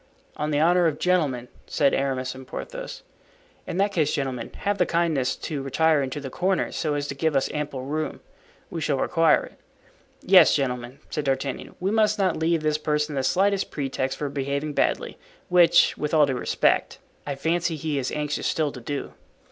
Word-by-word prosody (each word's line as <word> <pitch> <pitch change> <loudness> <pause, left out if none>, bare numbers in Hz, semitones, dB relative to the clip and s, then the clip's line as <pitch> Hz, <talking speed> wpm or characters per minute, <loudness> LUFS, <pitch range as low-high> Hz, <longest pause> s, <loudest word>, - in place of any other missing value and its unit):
"On 150 - -2
the 145 -1 +1
honor 175 +2 +4
of 150 -2 -1
gentlemen," 150 -9 +1 0.2
said 140 -3 +2
Aramis 130 -2 -1
and 130 0 -11
Porthos. - - -7 0.6
"In - - -4
that 200 +1 +2
case, 155 -6 +1
gentlemen, 130 -4 -3
have 205 0 0
the 180 - +4
kindness 165 -6 +1
to 150 -4 -4
retire 155 +3 +2
into 135 +1 -3
the 135 -2 -7
corners, 185 +5 0
so 150 -2 -1
as 145 0 -2
to - - -4
give 150 +2 0
us 135 - +1
ample 145 -3 -4
room. 155 +2 -3 0.5
We 165 - -4
shall 145 -2 0
require 165 +3 +3
it." - - -17 0.6
"Yes, 185 -3 +7
gentlemen," 125 -2 -2
said 150 - -2
D'Artagnan, 135 0 -2
"we 190 +2 0
must 215 -1 +3
not 190 -4 +1
leave 160 0 0
this 155 0 +1
person 150 0 -1
the 135 - 0
slightest 195 +8 +1
pretext 135 -2 -2
for 145 - -2
behaving 140 +2 -2
badly, - - 0 0.3
which, 175 -1 +5
with 150 +1 -1
all 150 -2 +6
due 135 - -1
respect, 125 - +1 0.3
I 140 - -2
fancy 165 +3 0
he 155 -2 -2
is 130 - -2
anxious 150 -1 -2
still 155 -3 0
to 125 - -10
do." 140 +4 -5
150 Hz, 190 wpm, -25 LUFS, 135-165 Hz, 0.6 s, Yes